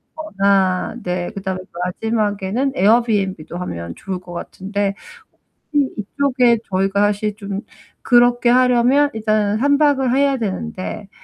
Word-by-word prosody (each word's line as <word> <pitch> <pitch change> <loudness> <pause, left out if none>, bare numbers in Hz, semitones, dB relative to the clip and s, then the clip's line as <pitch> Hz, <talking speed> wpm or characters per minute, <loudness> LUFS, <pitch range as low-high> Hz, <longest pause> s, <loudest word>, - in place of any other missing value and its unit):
하거나 195 -11 +1
네. 180 0 -2
그다음에 190 -1 -3 0.3
마지막에는 215 +4 -1
에어비앤비도 200 - +1
하면 85 - -5
좋을 190 -1 -5
거 180 -1 -11
같은데 200 +3 -3 0.8
혹시 285 -3 +1
이쪽에 250 +2 +2
저희가 195 +1 +1
사실 210 0 -2
좀 200 -1 -5 0.4
그렇게 245 0 +4
하려면 255 +3 +4
일단은 215 -1 0
3 285 +3 +3
박을 270 -4 +2
해야 280 -1 +2
되는데 215 -1 -5
210 Hz, 290 characters per minute, -19 LUFS, 195-245 Hz, 0.8 s, 그렇게